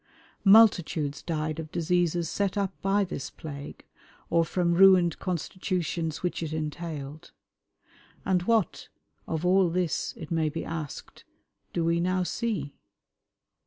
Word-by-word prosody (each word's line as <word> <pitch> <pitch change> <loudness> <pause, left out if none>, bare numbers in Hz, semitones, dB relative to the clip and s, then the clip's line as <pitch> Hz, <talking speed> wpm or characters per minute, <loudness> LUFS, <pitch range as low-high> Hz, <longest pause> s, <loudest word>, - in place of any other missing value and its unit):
Multitudes 175 -8 +5
died 155 -1 -3
of 160 -1 -7
diseases 175 0 +1
set 200 +4 -1
up 200 -1 0
by 200 +1 +2
this 180 -7 -5
plague, 145 -2 -9 0.5
or 170 0 +4
from 170 +1 0
ruined 180 -2 +5
constitutions 175 -2 -3
which 180 - -2
it 160 -2 -3
entailed. 155 -1 -5 0.9
And 185 -2 +2
what, 220 -1 0 0.4
of 160 +1 -2
all 185 0 +4
this, 175 -1 -1
it 155 - -9
may 160 -2 +1
be 165 +2 -5
asked, 155 -3 -7 0.5
do 170 - -1
we 170 0 +2
now 185 +1 +1
see? 180 - -3
170 Hz, 125 wpm, -27 LUFS, 155-185 Hz, 0.9 s, Multitudes